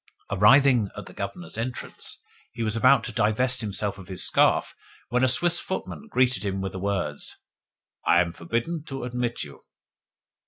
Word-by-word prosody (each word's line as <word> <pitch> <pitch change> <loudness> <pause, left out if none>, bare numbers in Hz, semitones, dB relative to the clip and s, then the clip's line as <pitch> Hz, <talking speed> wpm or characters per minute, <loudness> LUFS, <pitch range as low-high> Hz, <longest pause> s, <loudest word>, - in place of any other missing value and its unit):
Arrived 135 +9 +6
at 120 -7 +1
the - - -12
Governor's 105 - -6
entrance, 120 +2 -6 0.4
he 115 -1 -3
was 110 0 -1
about 130 +1 +5
to - - -3
divest 125 +4 +1
himself 100 -1 -3
of 95 - -11
his 95 -2 +2
scarf - - +3 0.4
when 125 +2 +1
a - - +5
Swiss 170 +7 +3
footman 200 +3 -5
greeted 130 - +2
him 95 -1 -2
with 95 0 -3
the 95 - -6
words, 100 0 -2 0.7
"I 85 - +4
am 85 -1 +1
forbidden 120 - -3
to 135 -4 -6
admit 125 -1 -2
you." 70 - -11
115 Hz, 165 wpm, -25 LUFS, 100-130 Hz, 0.7 s, Arrived